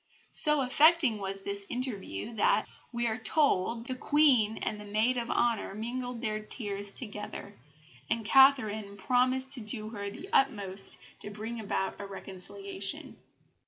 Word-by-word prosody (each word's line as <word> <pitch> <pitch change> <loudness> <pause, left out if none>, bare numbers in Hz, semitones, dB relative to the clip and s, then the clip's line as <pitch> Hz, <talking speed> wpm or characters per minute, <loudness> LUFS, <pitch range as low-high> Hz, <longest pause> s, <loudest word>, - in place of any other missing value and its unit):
So 300 -2 +8
affecting 280 -2 +4
was 195 0 -5
this 200 0 -4
interview 235 - -4
that, 215 - +2 0.3
we 240 -1 -2
are 225 0 -1
told, 230 - +1
the 255 - -4
Queen 255 -6 +3
and 210 - -4
the - - -9
maid 215 +5 +1
of 240 -1 -3
honour 230 -4 0
mingled 245 +2 -5
their 215 -2 -1
tears 205 -2 -5
together, 210 -2 -8 0.5
and 225 -1 -1
Catherine 220 -7 +4
promised 255 +5 +1
to 275 - +1
do 215 -1 0
her 200 -2 -6 0.3
utmost 200 -8 +1 0.2
to - - -7
bring 220 +3 -6
about 200 -2 -3
a 200 - -7
reconciliation. 195 +1 -7
220 Hz, 140 wpm, -29 LUFS, 200-255 Hz, 0.5 s, So